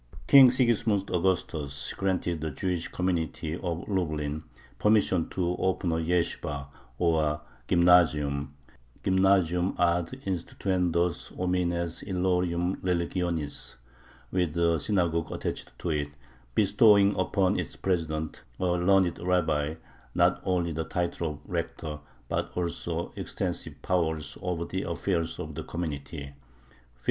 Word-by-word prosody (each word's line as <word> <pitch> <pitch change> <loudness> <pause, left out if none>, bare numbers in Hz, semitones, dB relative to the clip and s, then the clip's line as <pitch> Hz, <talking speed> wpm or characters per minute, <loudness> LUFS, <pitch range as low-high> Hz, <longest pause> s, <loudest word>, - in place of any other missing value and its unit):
King 135 -2 +9
Sigismund 115 -5 +2
Augustus 80 -7 -1
granted 90 -4 -1
the 80 - -2
Jewish 85 +3 -2
community 85 -4 -2
of 85 0 -4
Lublin 75 -6 -1 0.4
permission 105 -5 +3
to 90 -1 -1
open 95 -2 0
a 80 - +1
yeshibah, 80 -4 -1 0.3
or 80 -3 +1 0.3
"gymnazium" 80 -5 +4 0.5
(gymnazium 95 -2 +3
ad 85 -1 +3 0.2
instituendos 90 -2 -1
homines 85 -2 0
illorum 90 -1 0
religionis), 85 -6 -2 0.6
with 90 -3 0
a 85 -1 +3
synagogue 85 -3 0
attached - - -4
to 85 - -2
it, 75 -2 -1 0.5
bestowing 100 0 +5
upon 95 0 +1
its - - -4
president, 80 -4 -2 0.2
a - - 0
learned 90 0 +3
rabbi, 80 -4 +1 0.4
not - - +3
only 90 -2 0
the 80 +1 -2
title 85 -1 -2
of 75 - -12
"rector," 85 -3 -4 0.3
but - - -2
also 85 -1 -2
extensive - - -4
powers 80 -4 0
over 90 -2 -2
the 95 - -3
affairs 85 -1 -1
of - - -6
the - - -5
community 80 -2 -5
(1567). 70 0 -11
85 Hz, 115 wpm, -28 LUFS, 80-95 Hz, 0.6 s, King